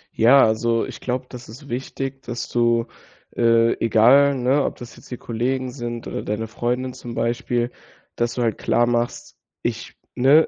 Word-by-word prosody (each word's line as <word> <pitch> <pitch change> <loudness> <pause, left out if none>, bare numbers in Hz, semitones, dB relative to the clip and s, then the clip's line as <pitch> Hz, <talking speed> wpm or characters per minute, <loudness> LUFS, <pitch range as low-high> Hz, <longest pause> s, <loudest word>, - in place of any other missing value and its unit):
Ja, 125 +5 +6
also 115 +1 +1
ich - - -9
glaube, 125 0 -2
das 125 -3 -10
ist 140 +5 -12
wichtig, 135 +2 -4
dass 120 -2 -5
du, 120 -1 +2 0.5
äh, 115 0 +4
egal, 125 +6 +5
ne, 130 +3 +2
ob - - -2
das 120 - -11
jetzt - - -16
die 125 - -5
Kollegen 125 +3 -2
sind 120 -2 -6
oder - - -4
deine 105 +2 -3
Freundin 125 +3 -2
zum 120 -1 -8
Beispiel 120 +1 -1 0.4
dass 120 0 -1
du 120 - 0
halt 115 - -1
klar 120 - +2
machst: 120 0 -2 0.3
„Ich, - - -4 0.2
ne, 140 +6 +5
120 Hz, 170 wpm, -22 LUFS, 115-130 Hz, 0.5 s, Ja